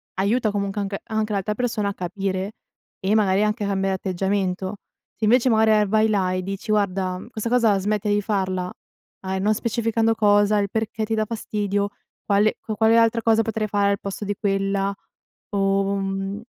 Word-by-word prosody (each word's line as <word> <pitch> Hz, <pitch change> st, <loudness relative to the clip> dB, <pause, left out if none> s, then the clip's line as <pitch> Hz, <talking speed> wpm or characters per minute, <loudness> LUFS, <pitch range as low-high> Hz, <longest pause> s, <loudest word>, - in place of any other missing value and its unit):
aiuta, 215 Hz, +3 st, +1 dB
comunque 200 Hz, 0 st, -2 dB
anche 195 Hz, 0 st, -3 dB
anche 220 Hz, -1 st, -2 dB
l'altra 200 Hz, +2 st, -1 dB
persona 225 Hz, -4 st, -1 dB
a -, -, -4 dB
capire, 190 Hz, +2 st, -3 dB, 0.5 s
e 200 Hz, +3 st, +1 dB
magari 200 Hz, -2 st, +3 dB
anche 210 Hz, 0 st, 0 dB
a -, -, -1 dB
cambiare 195 Hz, -1 st, 0 dB
atteggiamento. 190 Hz, +1 st, -1 dB, 0.4 s
Se 220 Hz, -, -9 dB
invece 245 Hz, +4 st, +4 dB
magari, 220 Hz, -1 st, +4 dB
ehm, 205 Hz, -, +1 dB
vai 215 Hz, +2 st, +3 dB
là 190 Hz, -3 st, +1 dB
e 185 Hz, -, -1 dB
dici: 195 Hz, +3 st, -4 dB
"Guarda" 190 Hz, -3 st, 0 dB
mhmm, -, -, -11 dB
"questa 225 Hz, -1 st, -4 dB
cosa 230 Hz, -5 st, +3 dB
smettila 210 Hz, +1 st, 0 dB
di 205 Hz, -, +2 dB
farla." 185 Hz, -3 st, -1 dB, 0.5 s
A 190 Hz, 0 st, -3 dB
e -, -, -1 dB
non 210 Hz, +3 st, +2 dB
specificando 225 Hz, 0 st, 0 dB
cosa, 205 Hz, 0 st, +4 dB
il 200 Hz, -1 st, 0 dB
perché 220 Hz, 0 st, -2 dB
ti 225 Hz, -, -3 dB
dà 215 Hz, -, +1 dB
fastidio, 205 Hz, -2 st, -2 dB, 0.4 s
quale 205 Hz, +1 st, +2 dB
qua 215 Hz, -, -4 dB
quale 220 Hz, +2 st, +4 dB
altra 230 Hz, 0 st, +3 dB
cosa 225 Hz, 0 st, +3 dB
potrei 220 Hz, -1 st, -2 dB
fare 200 Hz, 0 st, +2 dB
al 200 Hz, -, -1 dB
posto 200 Hz, +1 st, -5 dB
di 205 Hz, 0 st, -2 dB
quella? 195 Hz, 0 st, 0 dB, 0.6 s
O 195 Hz, 0 st, +1 dB
mhmm 195 Hz, +1 st, -3 dB
205 Hz, 190 wpm, -23 LUFS, 195-220 Hz, 0.6 s, invece